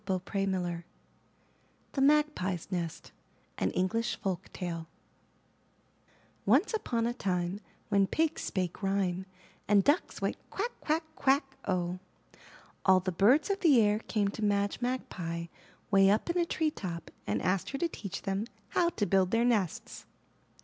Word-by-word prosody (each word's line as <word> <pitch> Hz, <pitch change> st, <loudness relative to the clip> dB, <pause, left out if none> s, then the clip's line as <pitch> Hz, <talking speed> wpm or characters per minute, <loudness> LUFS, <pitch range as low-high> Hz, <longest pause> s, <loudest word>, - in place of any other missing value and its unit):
170 190 Hz, +1 st, -1 dB
IN 195 Hz, -, +1 dB
THE -, -, -2 dB
NURSERY 170 Hz, 0 st, -4 dB, 1.1 s
THE 270 Hz, -, -1 dB
MAGPIE'S 275 Hz, -, +2 dB
NEST 170 Hz, -3 st, -4 dB, 0.5 s
An 95 Hz, -, +2 dB
English 215 Hz, -, 0 dB
Folk 190 Hz, -1 st, -3 dB
Tale 165 Hz, -2 st, -4 dB, 1.6 s
Once 270 Hz, -, +3 dB
upon 235 Hz, -, 0 dB
a 240 Hz, -, 0 dB
time 185 Hz, -4 st, -1 dB, 0.3 s
when 200 Hz, -2 st, +4 dB
pigs 320 Hz, +5 st, 0 dB
spake 185 Hz, -1 st, -2 dB
rhyme, 190 Hz, -2 st, 0 dB, 0.4 s
And 200 Hz, -1 st, +5 dB
ducks 290 Hz, -, +1 dB
went -, -, -1 dB
Quack, 460 Hz, +5 st, -2 dB
quack, 320 Hz, +2 st, +1 dB
quack, 270 Hz, 0 st, +2 dB
O! 180 Hz, -1 st, -1 dB, 0.8 s
All 190 Hz, -1 st, +6 dB
the 185 Hz, +1 st, -1 dB
birds 245 Hz, -, +4 dB
of 395 Hz, -, -1 dB
the 300 Hz, -10 st, +6 dB
air 210 Hz, -1 st, +3 dB
came 210 Hz, -2 st, 0 dB
to 215 Hz, +2 st, -5 dB
Madge 205 Hz, +1 st, +1 dB
Magpie 175 Hz, -9 st, -3 dB, 0.5 s
way 195 Hz, -1 st, +6 dB
up 215 Hz, -, +2 dB
in 350 Hz, -, -2 dB
a 340 Hz, -, 0 dB
tree 315 Hz, -2 st, 0 dB
top 170 Hz, -, -6 dB, 0.2 s
and 105 Hz, 0 st, 0 dB
asked 185 Hz, -, 0 dB
her 275 Hz, -, -3 dB
to 340 Hz, -, +1 dB
teach 200 Hz, -, -6 dB
them 195 Hz, +2 st, -1 dB, 0.2 s
how 340 Hz, -, +2 dB
to 220 Hz, -11 st, -1 dB
build 190 Hz, -2 st, +3 dB
their 230 Hz, +3 st, +2 dB
nests. 210 Hz, -8 st, -1 dB
200 Hz, 155 wpm, -31 LUFS, 185-260 Hz, 1.6 s, All